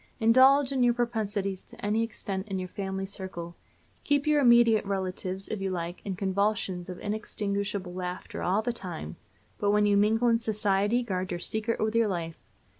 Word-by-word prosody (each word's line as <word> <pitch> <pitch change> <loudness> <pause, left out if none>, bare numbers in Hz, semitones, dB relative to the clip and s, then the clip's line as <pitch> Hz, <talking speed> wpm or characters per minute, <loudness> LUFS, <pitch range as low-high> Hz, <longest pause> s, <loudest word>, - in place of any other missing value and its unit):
Indulge 260 +4 +6
in 265 -2 0
your 240 -1 +4
propensities 205 -5 -1
to - - -10
any 215 +2 +1
extent 205 -3 -4
in 195 -2 -3
your 185 0 -3
family 190 0 -4
circle; 185 -3 -6 0.5
keep 285 -1 +1
your 300 -1 +3
immediate 235 -3 +6
relatives, 190 -1 -3
if 215 - -4
you 195 - -1
like, 175 -1 -4
in 195 -2 -3
convulsions 195 -1 -1
of 180 - -6
inextinguishable 200 -3 -3
laughter 180 0 -5
all 195 +5 +1
the 240 - -1
time; 175 - -7 0.4
but 205 - +1
when 210 0 +4
you 205 0 +3
mingle 220 +4 +3
in 230 -1 +4
society 210 +1 +1
guard 185 -4 -3
your 175 - -3
secret 220 +5 -2
with 215 0 0
your 230 -1 +3
life. 170 -4 -4
205 Hz, 180 wpm, -28 LUFS, 190-225 Hz, 0.5 s, Indulge